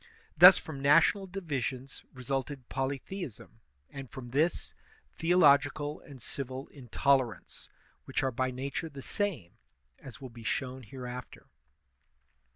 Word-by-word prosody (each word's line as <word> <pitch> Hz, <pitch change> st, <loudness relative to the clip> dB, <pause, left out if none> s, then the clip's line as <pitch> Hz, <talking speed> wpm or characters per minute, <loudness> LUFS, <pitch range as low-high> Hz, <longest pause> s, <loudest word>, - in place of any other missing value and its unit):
Thus 180 Hz, +4 st, +10 dB
from 150 Hz, -4 st, -7 dB
national 165 Hz, +7 st, +4 dB
divisions 135 Hz, -, -4 dB
resulted 130 Hz, 0 st, -4 dB
polytheism, 135 Hz, -, -5 dB, 0.3 s
and, 135 Hz, -2 st, -8 dB
from 125 Hz, -3 st, -9 dB
this, 155 Hz, +6 st, 0 dB, 0.4 s
theological 145 Hz, -3 st, +3 dB
and 140 Hz, -3 st, -13 dB
civil 130 Hz, +2 st, -6 dB
intolerance, 130 Hz, -1 st, -1 dB, 0.4 s
which -, -, -1 dB
are 135 Hz, -, +1 dB
by 130 Hz, +2 st, -1 dB
nature 140 Hz, +5 st, -4 dB
the 140 Hz, -3 st, -9 dB
same, 170 Hz, -, -3 dB, 0.4 s
as 130 Hz, -4 st, -11 dB
will 130 Hz, -3 st, -9 dB
be 115 Hz, -1 st, -12 dB
shown 130 Hz, +3 st, -2 dB
hereafter. 125 Hz, +1 st, -8 dB
135 Hz, 115 wpm, -30 LUFS, 125-150 Hz, 0.4 s, Thus